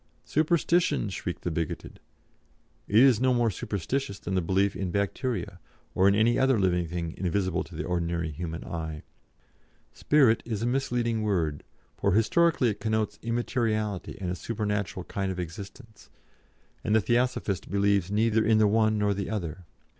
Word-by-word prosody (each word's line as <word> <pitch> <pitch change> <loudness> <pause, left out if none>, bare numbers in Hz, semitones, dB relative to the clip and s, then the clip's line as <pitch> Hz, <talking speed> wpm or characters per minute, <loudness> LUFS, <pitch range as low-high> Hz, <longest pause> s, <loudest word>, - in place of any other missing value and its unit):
'Superstition!' 155 -4 +2
shriek 90 -2 -5
the 90 - -2
bigoted. 80 -1 -4 0.9
It 105 - +4
is 130 -4 +5
no 130 -1 +3
more 120 -2 +2
superstition 100 +5 -3
than - - -3
the 95 - +2
belief 95 +3 +1
in 95 0 -3
Bacteria, 100 0 -2 0.3
or 95 - +4
in 100 - +4
any 110 +3 +3
other 130 -3 +3
living 90 -3 +1
thing 85 0 -4
invisible 95 0 0
to 85 - -13
the - - -3
ordinary 85 -2 -2
human 80 +2 -5
eye. 80 -2 -5 0.9
'Spirit' 135 -7 +3
is 110 -2 -3
a - - +1
misleading 120 -3 0
word, 85 -9 -1 0.3
for, 100 - +1
historically, 130 - +3
it 105 - -4
connotes 110 -2 -1
immateriality 115 -4 -1
and 90 -3 -3
a - - -2
supernatural 105 -3 -3
kind 95 +1 -3
of 90 - -5
existence, 100 +7 -9 0.7
and 105 - +1
the 110 - +5
Theosophist 120 -4 0
believes 100 -1 +2
neither 110 +1 +2
in 110 0 +4
the 110 - +5
one 110 +1 +3
nor 105 -1 +2
the 100 0 -4
other. 90 -4 -4
100 Hz, 160 wpm, -27 LUFS, 90-115 Hz, 0.9 s, is